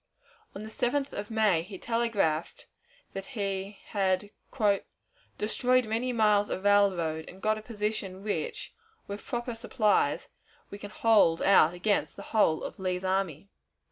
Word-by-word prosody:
On 200 - -6
the 215 - -7
7th 270 +5 -1
of 205 +2 -5
May 215 -7 +3
he 190 +3 -9
telegraphed 210 -9 -1 0.5
that 195 0 -5
he 195 0 -3
had 195 0 0 1.1
"destroyed 250 +4 +2
many 230 +4 -1
miles 210 -3 +3
of 190 - -3
railroad, 185 -6 +2
and 185 - -12
got 215 +2 +1
a - - -10
position 210 -4 -4
which, 215 - -3 0.3
with 200 +1 -7
proper 240 -1 -3
supplies, 210 - +1 0.4
we 200 - -8
can 205 - -8
hold 210 -7 +3
out 180 -4 +5
against 200 +3 0
the - - -9
whole 165 -8 +3
of - - -7
Lee's 185 -1 -2
army." 190 -2 -1
205 Hz, 140 wpm, -29 LUFS, 190-220 Hz, 1.1 s, out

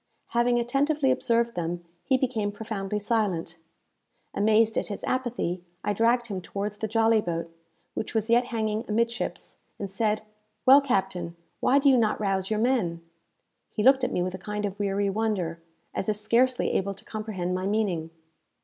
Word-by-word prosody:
Having 240 0 +2
attentively 275 +4 +2
observed 235 -2 +1
them, 175 0 -3 0.2
he 265 -1 +3
became 230 -6 -1
profoundly 210 -1 -4
silent. 200 -6 -1 0.7
Amazed 220 +2 +3
at - - -1
his 205 - -6
apathy, 240 -9 -2 0.2
I 210 - 0
dragged 235 +3 +2
him 200 -5 -4
towards 205 +3 -4
the 220 - -2
jolly 225 0 +3
boat, 165 -2 -4 0.4
which 220 - -4
was 220 -1 +1
yet 240 +1 +4
hanging 220 -2 -1
amid 230 +2 +1
ships, 235 - -5 0.2
and 200 -2 -5
said, 210 +1 0 0.4
"Well, 270 +2 +9
captain, 190 -9 -1 0.2
why 270 - +4
do 285 0 +3
you 265 -2 +7
not 220 -3 +2
rouse 195 -2 0
your 215 - 0
men?" 215 -9 +1 0.7
He 210 - -2
looked 265 +1 +6
at 250 - +1
me 175 - 0
with 185 0 -3
a 185 - -6
kind 210 +2 -3
of 200 0 -5
weary 200 0 0
wonder, 190 -6 -1 0.3
as 195 - -2
if 210 - +1
scarcely 240 +4 +2
able 195 +1 -1
to - - -16
comprehend 210 -5 -3
my 185 +1 -1
meaning. 195 -6 0
215 Hz, 175 wpm, -27 LUFS, 195-235 Hz, 0.7 s, Well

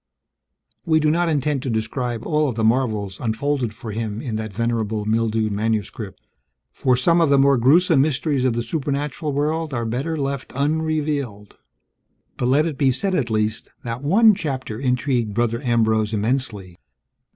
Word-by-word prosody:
We 160 -2 +3
do 155 0 +2
not 170 +1 +1
intend 145 -2 0
to 135 - -3
describe 115 +1 -2
all 150 -2 +1
of 120 - -4
the 110 - -1
marvels 110 -5 0
unfolded 125 +1 -1
for 110 +1 -8
him 110 -1 -3
in 115 -3 -4
that 110 -1 -4
venerable 110 -1 -1
mildewed 110 0 0
manuscript, 105 -1 -3 0.5
for 125 -1 +1
some 170 +7 +3
of 165 - +3
the 140 - +5
more 140 0 +5
gruesome 145 +5 +4
mysteries 145 -1 0
of 130 -2 +2
the 120 0 -2
supernatural 145 +1 -2
world 150 +1 -1
are 120 -1 -2
better 135 +8 -2
left 140 -2 -3
unrevealed; 145 -7 -1 0.8
but 125 - -1
let 140 +5 +3
it 155 -5 -4
be 135 - +4
said 190 +10 -1
at 140 -9 0
least, 110 +1 -1
that 120 +1 -4
one 210 +9 +5
chapter 130 - -4
intrigued 125 -4 0
Brother 115 0 0
Ambrose 110 -4 +1
immensely. 105 -5 -2
125 Hz, 160 wpm, -22 LUFS, 110-145 Hz, 0.8 s, the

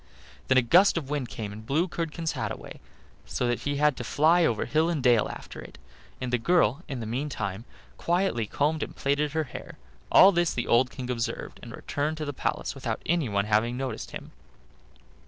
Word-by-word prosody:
Then 130 - +4
a 130 - +5
gust 175 - +5
of 145 -4 -4
wind 140 -5 -2
came 105 -1 -6
and 110 +1 -9
blew 150 +10 +1
Curdken's 165 -1 -3
hat - - -3
away, - - -8 0.5
so 125 - -2
that 120 0 0
he 145 0 -2
had 150 0 +3
to - - -4
fly 160 +8 +3
over 115 -9 +1
hill 160 +2 +2
and 155 -6 -1
dale 120 -4 +4
after - - -9
it, - - -12 0.4
and 125 -1 -4
the 125 - +3
girl 160 -2 +2
in 135 -5 -5
the - - -4
meantime 115 -4 -3 0.3
quietly 170 - 0
combed 150 +7 0
and - - -5
plaited 145 +1 0
her 160 0 +1
hair: 130 - -9 0.3
all 195 - +8
this 175 -2 +1
the 120 - -1
old 125 +2 +3
King 125 -2 -5
observed, 115 -2 -4
and - - -9
returned 150 +2 -3
to 155 - -3
the 145 - -4
palace - - -2
without - - -4
anyone 120 -13 +1
having 110 +3 +1
noticed 130 -4 -4
him. - - -9
140 Hz, 200 wpm, -27 LUFS, 120-160 Hz, 0.5 s, all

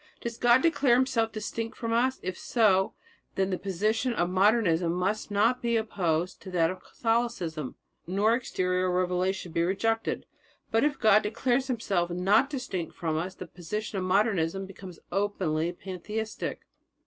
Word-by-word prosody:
"Does 235 -1 -5
God 240 +1 +5
declare 285 -7 +4
Himself 245 -3 +1
distinct 225 +1 -4
from 230 -1 -2
us? 255 +3 +2
If 185 0 -3
so, 195 -5 +2 0.4
then 190 0 0
the 185 - -1
position 215 +6 0
of 175 -4 0
Modernism 185 -4 +3
must 190 +6 -1
not 220 +5 +2
be 235 -1 +1
opposed 180 -6 -1
to 190 - -9
that 170 -2 +2
of 185 - -9
Catholicism, 225 - -2 0.3
nor 200 +5 +2
exterior 185 -6 0
revelation 180 0 0
be 165 - 0
rejected. 225 +6 0 0.5
But 225 - +3
if 295 -1 +1
God 215 -2 +5
declares 245 +5 0
Himself 200 -8 0
not 195 +9 +3
distinct 250 - -4
from 160 -2 -2
us, 180 +4 -3
the 185 - -7
position 195 +4 -5
of - - -2
Modernism 195 -2 +1
becomes 190 -2 -10
openly 175 -5 0
pantheistic." 200 +5 -5
200 Hz, 150 wpm, -28 LUFS, 180-230 Hz, 0.5 s, God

